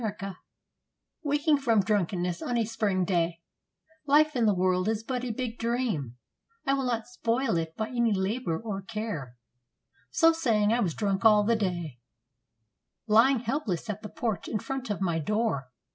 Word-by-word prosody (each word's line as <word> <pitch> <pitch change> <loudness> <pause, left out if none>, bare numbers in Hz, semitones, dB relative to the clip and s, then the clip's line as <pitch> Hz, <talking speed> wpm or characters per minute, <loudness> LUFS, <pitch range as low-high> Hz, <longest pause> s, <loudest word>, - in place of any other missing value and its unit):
WAKING 295 0 +2
FROM 230 -6 +3
DRUNKENNESS 180 -3 -1
ON 245 - -1
A 230 - +2
SPRING 205 -4 0
DAY 170 -2 0 0.7
âLife 305 +1 +5
in 235 -3 +3
the 210 - +4
World 185 +1 +1
is 220 0 -1
but 250 +1 -3
a 250 - -2
big 235 0 -4
dream; 225 - -1 0.5
I 275 - +2
will 270 -1 0
not 230 -2 -1
spoil 245 -2 -1
it 160 -1 -2
by 220 0 -2
any 235 -3 +1
labour 195 -2 -1
or 210 -4 -4
care.â 205 - -5 0.7
So 330 -2 +5
saying, 225 -9 +2
I 240 - +2
was 175 -9 0
drunk 200 -2 -1
all 210 -2 +6
the 230 +3 +2
day, 175 - -3 1.1
Lying 230 +3 +5
helpless 230 - -2
at 210 +1 -7
the 215 - -7
porch 220 -7 -3
in 220 - -1
front 265 +3 -5
of 205 -2 -2
my 170 -3 +1
door. 210 - -1
220 Hz, 165 wpm, -28 LUFS, 185-240 Hz, 1.1 s, all